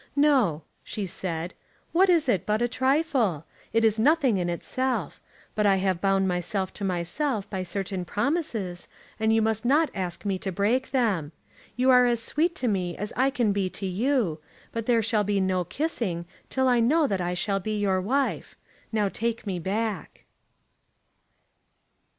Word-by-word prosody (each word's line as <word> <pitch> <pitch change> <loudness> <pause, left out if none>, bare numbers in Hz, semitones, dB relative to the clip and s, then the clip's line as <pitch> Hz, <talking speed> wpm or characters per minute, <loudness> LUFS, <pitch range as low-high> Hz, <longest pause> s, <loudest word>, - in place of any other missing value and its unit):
"No," 260 - +3 0.2
she 210 - -4
said. 175 -2 -4 0.4
"What 370 +3 +4
is 335 -5 +4
it 195 -8 +2
but 210 0 +1
a 240 - +2
trifle! 260 - +1 0.3
It 225 0 +3
is 220 0 +3
nothing 270 - +3
in 175 -1 -1
itself. 230 - -2 0.3
But 210 -1 +2
I 195 - +5
have 190 -2 0
bound 195 -1 +2
myself 185 +2 -2
to 205 - -7
myself 195 - -1
by 190 -2 -2
certain 185 0 -3
promises, 210 - -2 0.3
and 220 0 +2
you 225 0 +3
must 220 0 0
not 290 +6 +3
ask 185 0 -4
me 195 -2 -1
to 190 - -3
break 220 +8 +1
them. 200 - 0 0.4
You 255 +1 +3
are 250 -1 +6
as 240 -1 +2
sweet 325 +9 0
to 255 - -2
me 185 -5 -1
as 210 +1 -4
I 260 +2 +3
can 245 -6 +1
be 195 -2 0
to 195 - -6
you, 200 - 0 0.3
but 230 -1 -4
there 230 -2 +3
shall 215 -1 +2
be 205 0 0
no 185 -1 +1
kissing 195 - -2 0.2
till 260 0 +1
I 245 -1 +4
know 295 +7 +3
that 195 -8 -1
I 175 0 -1
shall 195 +2 0
be 215 +3 -3
your 195 -2 +1
wife. 265 +8 -1 0.4
Now 215 -2 +1
take 230 +3 -3
me 190 -3 -2
back." 205 +2 -3
210 Hz, 175 wpm, -26 LUFS, 185-250 Hz, 0.4 s, are